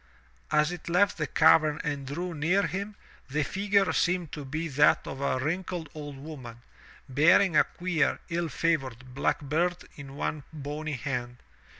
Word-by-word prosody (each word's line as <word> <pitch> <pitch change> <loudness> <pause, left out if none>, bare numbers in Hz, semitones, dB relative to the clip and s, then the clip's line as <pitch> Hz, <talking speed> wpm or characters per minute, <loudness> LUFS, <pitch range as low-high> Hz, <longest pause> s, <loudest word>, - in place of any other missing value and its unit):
As 150 +2 +3
it 175 -1 -7
left 190 +2 +3
the 150 - 0
cavern 155 -1 +4
and 145 -3 -3
drew 175 +6 -4
near 170 +6 +2
him, 200 +2 -4 0.3
the 150 +3 0
figure 195 +4 +1
seemed 175 -3 +1
to 150 - -6
be 155 +5 -3
that 150 0 +4
of 135 - -6
a 140 -2 +1
wrinkled 165 +3 -3
old 145 -2 -7
woman, 130 -5 -9 0.4
bearing 165 +6 +4
a - - +6
queer, 175 -5 0
ill 170 -1 -1
favored, 130 -5 -1
black 140 - 0
bird 170 +5 -1
in 140 -1 -9
one 150 +1 -2
bony 150 0 -5
hand. 125 -2 -4
150 Hz, 160 wpm, -28 LUFS, 140-175 Hz, 0.4 s, a